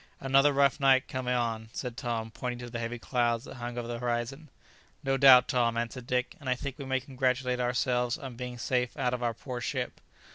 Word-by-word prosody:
"Another 135 +2 +4
rough 140 +1 +3
night 135 -1 +4
coming 125 -1 -2
on!" 115 -2 -1
said 125 -3 -4
Tom, 115 -2 -3
pointing 125 +2 -4
to 120 0 -8
the 120 - -4
heavy 115 +1 -3
clouds 120 -1 0
that - - -10
hung 120 0 -5
over 120 -1 -3
the 120 0 -4
horizon. 120 +5 -3 0.5
"No 135 -1 +1
doubt, 135 -2 +8
Tom!" 120 -3 +1
answered 120 +1 -4
Dick, 125 0 -1
"and 140 -3 -5
I 125 - +3
think 135 +2 -6
we 140 - -5
may 130 0 0
congratulate 130 -1 -1
ourselves 125 0 +1
on 130 -3 -8
being 125 0 -6
safe 125 0 -1
out 125 - 0
of 125 - -2
our 120 -1 0
poor 125 0 -6
ship." - - -3
125 Hz, 215 wpm, -29 LUFS, 120-130 Hz, 0.5 s, doubt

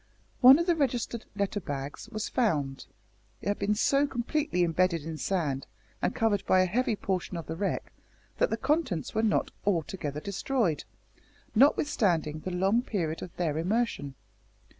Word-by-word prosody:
One 260 +2 +9
of 340 - 0
the 345 -2 +3
registered 245 -5 -1
letter 200 0 -1
bags 145 +3 -6
was 215 -2 -3
found. 145 - 0 0.5
It - - -3
had 205 - -1
been 205 +1 +1
so 275 +6 +3
completely 255 - 0
imbedded 170 -1 +1
in 160 -1 -5
sand, 150 -8 -1 0.3
and - - 0
covered 215 -3 +1
by 185 - +5
a - - +4
heavy 230 +4 0
portion 185 -2 -2
of 165 - -6
the 160 - -5
wreck, 195 +3 -2 0.5
that - - +3
the 225 - -1
contents 265 - 0
were 220 - +1
not 220 -2 +1
altogether 165 -5 -1
destroyed, 200 - -1 0.7
notwithstanding 200 - +3
the 185 - -5
long 190 +6 +2
period 170 -10 -2
of 180 - -8
their 160 -3 0
immersion. 180 - -1
195 Hz, 160 wpm, -29 LUFS, 165-235 Hz, 0.7 s, One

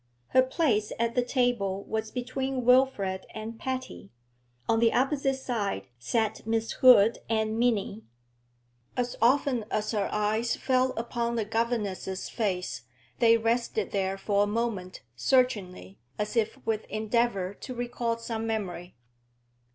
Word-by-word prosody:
Her 255 - +5
place 255 -6 +1
at 230 0 0
the 250 - +2
table 240 -7 0
was 220 0 -3
between 260 +1 -3
Wilfrid 250 -7 +3
and 220 +1 -6
Patty; 255 - -5 0.6
on 225 - +3
the 230 -1 +4
opposite 270 +1 +1
side 210 - -3
sat 220 - -1
Miss 225 0 0
Hood 230 -4 +6
and 220 0 0
Minnie. 220 -3 +1 1.0
As 245 -1 -1
often 255 0 +3
as 215 0 -1
her 205 -3 0
eyes 215 +3 0
fell 255 0 +1
upon 235 0 -2
the 225 -2 0
governess's 210 -4 -2
face, 190 -6 -2 0.4
they 230 -1 +6
rested 230 -3 0
there 195 -1 -1
for 200 +1 +1
a 205 - +3
moment, 205 -4 -3
searchingly, 180 - 0 0.2
as 210 +3 -3
if 225 +2 +1
with 220 -1 -1
endeavour 215 -3 0
to 255 - -6
recall 240 -1 -2
some 225 -1 -4
memory. 185 -5 -4
225 Hz, 135 wpm, -28 LUFS, 205-245 Hz, 1.0 s, Hood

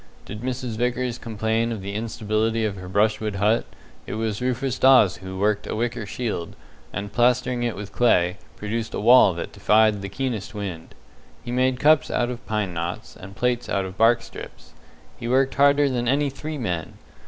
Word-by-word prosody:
Did 105 +2 -8
Mrs. 125 -2 -4
Vickers 125 0 -1
complain 110 +1 -1
of 110 -4 -5
the 100 +1 -5
instability 110 +1 -1
of 105 -2 -2
her 90 -1 -9
brushwood 105 +1 +1
hut, 105 +4 +2 0.4
it - - -4
was 110 -1 -2
Rufus 125 +1 -1
Dawes 130 -8 +6
who 95 0 -8
worked 105 +1 0
a - - -3
wicker 115 -1 -2
shield, 105 -7 -4 0.4
and 100 +2 -5
plastering 125 0 +2
it 120 -3 -1
with 100 0 -7
clay, 90 -6 +2 0.2
produced 110 +1 -4
a - - -2
wall 115 -4 +6
that 85 - -5
defied 105 +1 +3
the 100 - -5
keenest 115 -2 -4
wind. 95 -6 -6 0.5
He 120 - -4
made 130 0 +1
cups 155 -1 +4
out 120 0 0
of 125 0 -7
pine 105 -4 -1
knots, 85 +1 -5
and 95 +1 -11
plates 120 +1 -1
out 100 -1 0
of 95 0 -8
bark 115 +2 +4
strips. - - -11 0.4
He 115 - -6
worked 130 +2 +2
harder 140 +1 +4
than 120 -3 -1
any 140 +2 +2
three 155 +3 -6
men. 90 - -3
115 Hz, 185 wpm, -23 LUFS, 100-125 Hz, 0.5 s, Dawes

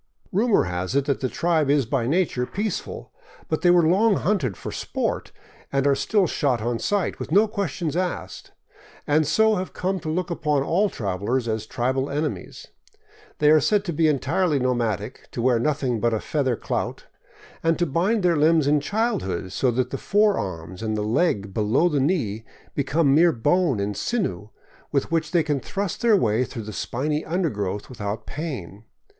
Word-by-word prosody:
Rumor 215 +3 +3
has 90 +5 -3
it 140 -1 +2
that 140 -1 0
the 130 - -1
tribe 160 -2 +1
is 140 -2 +3
by 120 0 -1
nature 145 -5 0
peaceful; 205 -1 -4 0.4
but 155 - -1
they 175 - +4
were 175 -2 +5
long 200 +5 +4
hunted 185 - 0
for - - -6
sport - - -3 0.4
and 135 0 +1
are 140 - +5
still 200 +7 +2
shot 140 -6 0
on 115 +1 -2
sight, 205 -4 -1
with - - -6
no 205 +6 +5
questions 180 -7 -3
asked, 175 - -3 0.5
and 150 0 +2
so 220 +7 +3
have 185 +1 -4
come 190 +1 -1
to 155 - -5
look 175 +2 -2
upon 150 -4 0
all 195 +8 +2
travelers 105 - -2
as 110 -1 -2
tribal 130 +4 -1
enemies. 150 +2 -4 0.7
They 150 0 +4
are 155 - +7
said 205 +7 +1
to 170 - -2
be 160 +1 +3
entirely 155 +2 +1
nomadic, 120 -4 -2
to 120 - -3
wear 125 -2 +3
nothing 130 -3 0
but 115 +1 +1
a - - -1
feather 130 -3 0
clout, - - -3 0.6
and 165 0 +2
to 175 - +1
bind 180 +8 +1
their 175 -2 +3
limbs 155 0 +4
in 145 +1 +3
childhood, 175 - -2
so 130 - +1
that 125 +1 -1
the 135 - -3
forearm 95 - 0
and 110 -1 -2
the 105 - -1
leg 105 - 0
below 110 - +2
the 150 -4 0
knee 130 - 0 0.3
become 140 +1 +2
mere 165 +3 +5
bone 145 - +1
and 100 +1 -2
sinew 105 - -2 0.4
with 140 +2 0
which 160 -2 0
they 170 -1 +2
can 145 -2 -1
thrust 195 +8 -4
their 230 -3 +5
way 115 - +2
through 115 -3 -6
the 110 0 -7
spiny 150 +9 -2
undergrowth 105 - -2
without 105 -3 -5
pain. 115 - -6
145 Hz, 180 wpm, -24 LUFS, 115-175 Hz, 0.7 s, are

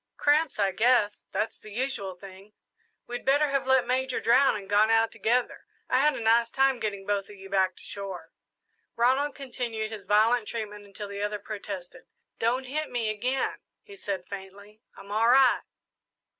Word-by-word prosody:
"Cramps, 300 0 +2
I 200 -2 +2
guess 215 0 +2
that's 220 - -2
the 215 - -12
usual 210 -5 -3
thing. 195 +2 -13 0.5
We'd 245 0 -6
better 285 +2 +3
have 275 -1 0
let 265 -1 +4
Major 260 0 0
drown 250 +3 +4
and 200 -2 -7
gone 210 +2 +4
out 225 0 +3
together. 245 +2 -1 0.2
I 255 - +4
had 300 +2 +3
a - - -5
nice 230 +1 +3
time 270 -1 +2
getting 200 -3 -3
both 200 -1 0
of 205 - -11
you 195 0 -12
back 190 -2 +2
to - - -13
shore." 195 -3 -7 0.6
Ronald 265 +5 +2
continued 235 -5 -4
his 205 -3 -8
violent 215 +2 +3
treatment 210 -3 -5
until 205 +1 -8
the 200 0 -6
other 210 0 -1
protested. 205 +1 -8 0.3
"Don't 240 +3 +1
hit 300 +4 -3
me 230 -3 -1
again," 250 +5 -1 0.2
he 415 -3 -13
said 195 - -4
faintly, 200 +2 -10 0.2
"I'm 200 - -11
all 220 +2 +2
right!" 260 +1 +5
220 Hz, 175 wpm, -27 LUFS, 200-255 Hz, 0.6 s, right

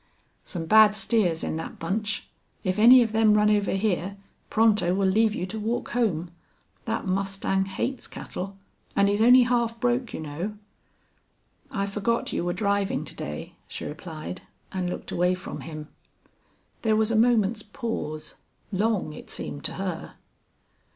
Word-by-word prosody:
"Some 170 -3 -4
bad 215 +2 +7
steers 195 -6 +2
in - - -2
that 160 - -6
bunch. 205 +5 -2 0.4
If 185 +1 0
any 245 +3 +9
of 225 - -3
them 220 -1 +4
run 210 0 +4
over 205 -1 +2
here 195 -1 -1 0.3
Pronto 210 -5 +3
will 195 0 +2
leave 215 +2 +3
you 180 - -2
to 220 +4 -6
walk 225 +3 -2
home. 180 -9 0 0.5
That 225 0 -2
mustang 195 0 0
hates 240 +7 -3
cattle. 195 +2 -7 0.4
And 200 0 +4
he's 205 +1 +1
only 250 +2 +8
half 235 -1 0
broke, 245 0 0
you - - -5
know." 165 +8 -5 1.1
"I 195 -2 -1
forgot 210 +3 -1
you - - -1
were 175 - 0
driving 200 +1 0
to - - -10
day," 75 0 -6
she - - -6
replied, 160 +2 -7 0.3
and 185 -2 -2
looked - - -6
away 180 +1 +2
from 185 - -7
him. 155 -2 -7 0.9
There 220 -1 +2
was 220 +1 +2
a - - +1
moment's 225 -2 +3
pause 205 - -5 0.3
long, 200 -5 0
it - - -11
seemed 145 - -5
to - - +3
her. 185 -4 -5
200 Hz, 155 wpm, -26 LUFS, 180-225 Hz, 1.1 s, any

